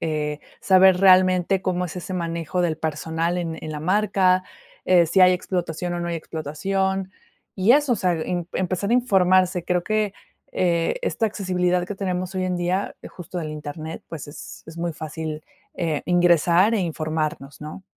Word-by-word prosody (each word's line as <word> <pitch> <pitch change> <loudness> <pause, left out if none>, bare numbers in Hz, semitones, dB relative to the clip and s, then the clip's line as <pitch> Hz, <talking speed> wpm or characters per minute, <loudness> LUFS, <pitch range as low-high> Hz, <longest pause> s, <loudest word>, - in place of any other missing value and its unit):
eh, 150 -2 -2 0.2
saber 190 -1 +5
realmente 185 0 +4
cómo 180 -1 -1
es 165 - -9
ese 180 +1 -5
manejo 170 0 -2
del 165 -2 0
personal 160 +2 -2
en 165 -2 -3
en 155 - -6
la 150 - -5
marca, 185 0 +2 0.4
eh, 175 -2 +5
si 190 +4 +2
hay 185 0 +7
explotación 175 -1 -3
o 175 - -3
no 170 - -3
hay 170 - -2
explotación, 190 +5 -2 0.5
y 195 +5 +4
eso, 290 -2 +3
o - - -4
sea, 180 -3 +1
em 170 +1 -3
empezar 185 +2 -2
a - - +3
informarse, 185 -6 +3
creo 180 0 0
que, 215 0 -1 0.4
eh, 170 - +1
esta 230 - 0
accesibilidad 180 -4 0
que 205 - -6
tenemos 185 -1 -3
hoy 185 - 0
en 185 -1 -1
día, 180 +3 -1
justo 180 0 -8
del 155 -3 -4
Internet, 155 +1 -7
pues, 155 -3 -7
es 145 - -10
es 160 +1 -11
muy 170 0 -2
fácil, 155 0 -6 0.3
eh, 160 -4 -2
ingresar 175 +3 +4
e 210 - +1
informarnos, 155 -4 -3
¿no? 155 +5 -8
180 Hz, 175 wpm, -23 LUFS, 160-185 Hz, 0.5 s, hay